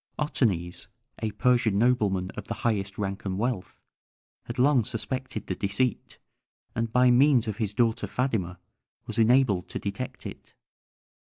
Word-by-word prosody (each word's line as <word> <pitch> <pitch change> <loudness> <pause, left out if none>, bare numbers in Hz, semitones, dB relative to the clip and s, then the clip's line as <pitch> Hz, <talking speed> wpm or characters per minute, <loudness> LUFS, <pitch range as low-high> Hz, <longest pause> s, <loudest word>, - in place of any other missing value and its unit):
Otanes, 95 - -1 0.3
a 110 - 0
Persian 120 -2 +2
nobleman 105 -6 +2
of - - -8
the - - -3
highest 100 -3 0
rank 100 -1 -3
and 95 -2 -2
wealth, 115 -3 -3 0.7
had 120 - -6
long 130 -1 +4
suspected 130 +1 -4
the - - -2
deceit, 100 +5 -1 0.6
and 115 0 -2
by 125 +1 +5
means 125 -2 +5
of 105 -2 -3
his 110 -4 -1
daughter 115 0 +1
Phædyma 110 -9 -1 0.5
was - - -4
enabled 115 -5 +3
to - - -4
detect 100 +5 -5
it. - - -9
115 Hz, 145 wpm, -27 LUFS, 100-125 Hz, 0.7 s, by